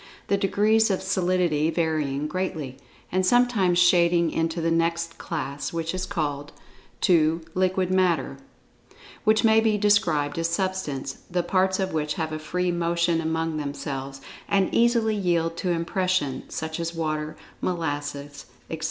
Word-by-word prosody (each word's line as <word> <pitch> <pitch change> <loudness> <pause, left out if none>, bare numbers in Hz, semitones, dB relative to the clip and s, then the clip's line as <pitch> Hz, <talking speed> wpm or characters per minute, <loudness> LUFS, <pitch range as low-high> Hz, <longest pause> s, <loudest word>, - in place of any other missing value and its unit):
the 200 - +4
degrees 215 +3 +3
of 190 - +1
solidity 180 -5 +1
varying 155 -4 -1
greatly, 155 -6 -4 0.3
and 185 +1 +1
sometimes 210 -4 +3
shading 175 -2 +4
into 165 +1 -1
the 165 0 0
next 165 0 0
class, 145 -4 -4
which 165 0 -3
is 185 0 -3
called: 145 -6 -3 0.5
(2) 165 -3 +3
Liquid 185 0 +1
Matter, 185 -3 +1 0.9
which 215 +2 +4
may 220 -1 +5
be 220 -1 +2
described 170 -8 +2
as 165 0 0
Substance, 170 -7 -2
the 180 0 0
parts 190 +1 +1
of 190 -2 -1
which 150 -1 -1
have 160 -1 -3
a 155 - -4
free 180 +3 -1
motion 170 -1 +1
among 160 0 -1
themselves, 140 -2 -5 0.3
and 195 -2 +2
easily 230 -2 +3
yield 170 -4 0
to 185 - -2
impression, 170 -4 -1
such 160 +1 -4
as 170 0 -3
water, 155 -1 -3 0.2
molasses, 145 -4 -4 0.2
etc. 160 - -4
170 Hz, 145 wpm, -25 LUFS, 155-185 Hz, 0.9 s, may